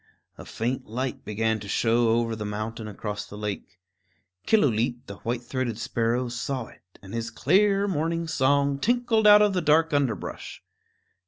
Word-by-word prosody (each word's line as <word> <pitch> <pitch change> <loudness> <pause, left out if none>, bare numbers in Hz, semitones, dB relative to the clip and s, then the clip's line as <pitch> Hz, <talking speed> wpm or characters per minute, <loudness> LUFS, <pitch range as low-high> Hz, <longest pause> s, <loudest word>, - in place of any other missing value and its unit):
A - - -11
faint 125 +3 -3
light 125 +3 -4
began 110 +1 -1
to 105 - -9
show 115 +3 +2
over 115 0 +1
the 110 - -5
mountain 110 +2 -5
across 105 0 -5
the 105 - -10
lake. 105 -4 -5 0.7
Killooleet, 120 - +2
the 100 - -9
white 120 +1 -3
throated 120 -2 -3
sparrow, 120 +2 -1
saw 120 +1 -3
it, - - -17 0.2
and 95 - -10
his 115 0 -3
clear 200 - +2
morning 165 -1 -1
song 140 -1 +2
tinkled 235 - +2
out 210 0 +8
of 205 -1 +2
the 180 - 0
dark 160 +1 +3
underbrush. 135 -8 -2
120 Hz, 160 wpm, -26 LUFS, 110-160 Hz, 0.7 s, out